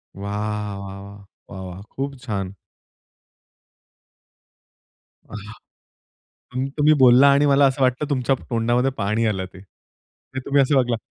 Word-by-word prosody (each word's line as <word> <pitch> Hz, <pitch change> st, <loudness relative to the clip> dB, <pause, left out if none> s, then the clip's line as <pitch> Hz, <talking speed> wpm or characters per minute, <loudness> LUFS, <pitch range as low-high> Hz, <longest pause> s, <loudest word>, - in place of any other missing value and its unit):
वाह, 105 Hz, +1 st, -4 dB
वाह, 100 Hz, 0 st, -8 dB
वाह, 100 Hz, 0 st, -11 dB, 0.3 s
वाह, 95 Hz, -, -8 dB
वाह! 90 Hz, 0 st, -8 dB
खूप 140 Hz, +1 st, -3 dB
छान. 100 Hz, -6 st, -4 dB, 2.7 s
अहा! 105 Hz, +1 st, -10 dB, 1.0 s
तुम 130 Hz, +1 st, -2 dB
तुम्ही 150 Hz, +1 st, +5 dB
बोलला 130 Hz, +2 st, +7 dB
आणि 140 Hz, +1 st, +3 dB
मला 140 Hz, 0 st, +5 dB
असं 135 Hz, 0 st, 0 dB
वाटलं 130 Hz, +3 st, +1 dB
तुमच्या 135 Hz, -1 st, +1 dB, 0.2 s
तोंडामध्ये 120 Hz, +3 st, +1 dB
पाणी 110 Hz, +3 st, 0 dB
आलं 95 Hz, -3 st, -1 dB
ते. 95 Hz, -, -12 dB
ते 115 Hz, +6 st, -14 dB
तुम्ही 140 Hz, 0 st, +3 dB
असं 140 Hz, +2 st, +1 dB
वागला 125 Hz, -3 st, +2 dB
120 Hz, 130 wpm, -22 LUFS, 100-135 Hz, 2.7 s, बोलला